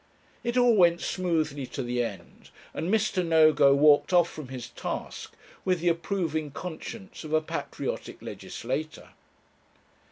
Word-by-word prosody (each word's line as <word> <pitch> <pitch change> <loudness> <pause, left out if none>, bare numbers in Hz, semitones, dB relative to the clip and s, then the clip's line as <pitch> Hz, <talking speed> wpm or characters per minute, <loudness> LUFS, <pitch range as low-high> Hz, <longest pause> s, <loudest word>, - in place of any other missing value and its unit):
It 240 +1 -1
all 245 -2 +5
went 170 -3 +5
smoothly 155 -7 -1
to - - -5
the 120 0 0
end, 95 -7 -8 0.2
and 170 - -2
Mr. 215 -4 +1
Nogo 155 -4 +5
walked 145 +3 +5
off 175 -2 +5
from 155 -4 -8
his 125 -2 -7
task - - -6 0.3
with 185 -2 +1
the 175 +1 +2
approving 165 -3 -1
conscience 180 +6 -8
of 155 0 -6
a 155 - +5
patriotic 155 - -5
legislator. 150 +6 -5
160 Hz, 135 wpm, -27 LUFS, 145-180 Hz, 0.3 s, all